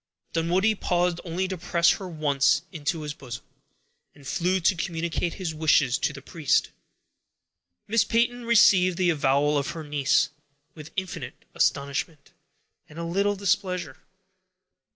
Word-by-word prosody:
Dunwoodie 180 +6 +2
paused 175 -3 0
only 180 +2 -2
to 185 -2 -5
press 170 -1 +3
her 190 -2 -4
once 145 -2 +2 0.2
to 160 +2 0
his 150 -1 -4
bosom, 125 -4 -9 0.7
and 140 -2 -14
flew 180 +6 0
to 185 +2 +2
communicate 170 -1 -2
his 180 -4 -4
wishes 155 -5 +3
to - - 0
the 135 -2 -11
priest. 155 -4 0 1.2
Miss 230 +1 +3
Peyton 240 +1 0
received 195 -6 +5
the 180 -2 +3
avowal 145 -1 +2
of 140 - -3
her 160 - -5
niece 145 -2 +1 0.4
with 155 -1 -11
infinite 185 -1 -6
astonishment, 140 +2 -1 0.6
and 150 - -13
a 170 - -4
little 200 +4 0
displeasure. 185 -6 -1
170 Hz, 135 wpm, -26 LUFS, 150-185 Hz, 1.2 s, received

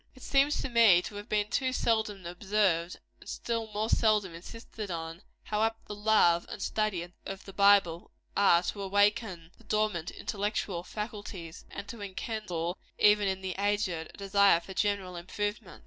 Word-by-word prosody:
It 260 - -14
seems 280 +2 +3
to - - -1
me 225 -7 +6
to 205 - -7
have 205 - -9
been 210 -1 +1
too 260 -2 +1
seldom 220 -6 0
observed, 180 -1 0 0.2
and - - -12
still 230 -1 -3
more 210 +1 -1
seldom 215 -6 +2
insisted 215 +4 -8
on, 165 0 -5 0.2
how 210 0 -2
apt 225 0 -1
the - - -5
love 205 -5 +3
and - - -7
study 210 -5 -1 0.2
of 195 0 -7
the 195 - -10
Bible 200 -4 +4 0.3
are 180 -4 +5
to 200 +3 -3
awaken 200 -3 +1
the - - -18
dormant 210 -6 0
intellectual 205 -3 -3
faculties, 205 -5 -7
and 200 - -7
to 230 0 -8
enkindle, 190 -4 -4 0.2
even 210 -1 +5
in 190 0 -1
the 190 -1 -3
aged, 205 0 +1 0.2
a - - -16
desire 200 -2 +4
for 190 +3 -10
general 200 -2 -1
improvement. 200 +1 -4
205 Hz, 165 wpm, -30 LUFS, 180-215 Hz, 0.3 s, me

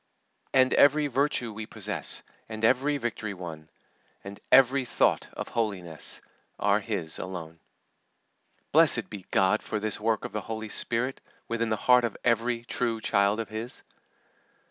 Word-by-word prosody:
"And 130 -1 +4
every 150 +1 +5
virtue 135 -4 0
we 110 +1 -6
possess, 105 -7 -4 0.3
And 110 0 -2
every 135 +5 +3
victory 110 -5 -4
won, 80 -3 -8 0.5
And 100 0 -9
every 135 +1 +6
thought 125 - +1
of - - -6
holiness, 95 -8 -3 0.4
Are - - +2
His 80 -1 -2
alone." 85 -3 -7 1.1
Blessed - - +4
be 100 -3 -8
God 95 +3 +3
for 110 - -3
this 110 0 0
work 110 +1 0
of - - -5
the 105 - -3
Holy 110 0 -6
Spirit 125 +5 -1 0.3
within 115 0 -1
the 110 - +1
heart 125 +3 +4
of 115 -3 -2
every 115 0 +1
true 120 -1 -1
child 100 0 +2
of 115 - -4
His! 115 +3 -6
110 Hz, 145 wpm, -27 LUFS, 100-125 Hz, 1.1 s, every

